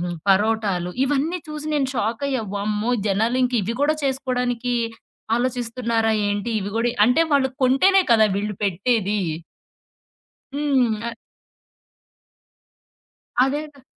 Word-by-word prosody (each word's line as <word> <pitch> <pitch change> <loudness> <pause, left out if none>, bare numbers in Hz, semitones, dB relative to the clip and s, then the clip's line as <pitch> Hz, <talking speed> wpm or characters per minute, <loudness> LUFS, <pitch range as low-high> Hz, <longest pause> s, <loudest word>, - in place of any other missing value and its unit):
హ్మ్, 175 0 -3
పరోటాలు 195 -3 +2
ఇవన్నీ 290 +6 0
చూసి 305 0 -6
నేను 275 -3 +1
షాకయ్య. 240 +3 -1
వామ్మో! 210 +3 -1 0.2
జనాలింకివి 230 +1 +1
కూడా 300 +2 +3
చేసుకోవడానికి 250 -2 -1 0.6
ఆలోచిస్తున్నారా 235 -2 0 0.2
ఏంటి? 205 +3 -2
ఇవి 200 +1 -4
గూడా 235 +1 +1 0.2
అంటే 250 +7 +3
వాళ్ళు 270 -2 +3
కొంటేనే 320 +10 +5
కదా 220 -2 +6
వీళ్ళు 210 0 -2
పెట్టేది. 205 +2 0 1.4
హ్మ్. 265 -6 +1
అ - - -5 2.3
అదేగా! 285 0 -4
240 Hz, 100 wpm, -22 LUFS, 215-265 Hz, 2.3 s, కదా